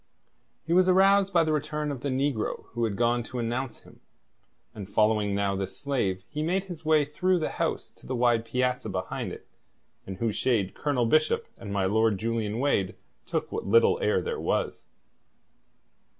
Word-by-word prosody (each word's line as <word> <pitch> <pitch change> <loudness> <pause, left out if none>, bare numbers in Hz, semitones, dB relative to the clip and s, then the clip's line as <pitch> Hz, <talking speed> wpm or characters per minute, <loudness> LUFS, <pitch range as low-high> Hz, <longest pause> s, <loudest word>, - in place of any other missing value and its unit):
He 165 - 0
was 185 +1 +5
aroused 195 +1 +5
by 170 -3 +4
the 155 -1 0
return 150 0 -2
of 135 -4 -6
the 140 - -2
negro 130 -3 -1
who 120 0 -1
had 105 -3 -2
gone 120 +2 +2
to 120 +2 -7
announce 120 +2 -3
him, - - -18 0.7
and 100 -2 -8
following 105 -1 +2
now 100 -1 0
this 95 0 -4
slave, 100 -10 -1
he 150 - -4
made 180 +4 0
his 175 -5 -9
way 155 -2 +4
through 180 +5 +1
the 160 - -2
house - - -2
to - - -16
the 130 - -2
wide 120 -2 +3
piazza 125 -1 -1
behind 95 -1 -4
it, - - -10 0.6
in 95 - -5
whose 110 +2 -1
shade 110 -7 +1
Colonel 140 -5 0
Bishop 155 +6 +2
and 100 -3 -8
my 100 -1 0
Lord 110 +1 +2
Julian 110 0 -2
Wade 120 -8 +1 0.3
took - - -2
what - - -4
little 115 +4 +4
air 105 -3 +2
there - - -3
was. - - -2
120 Hz, 180 wpm, -27 LUFS, 105-150 Hz, 0.7 s, was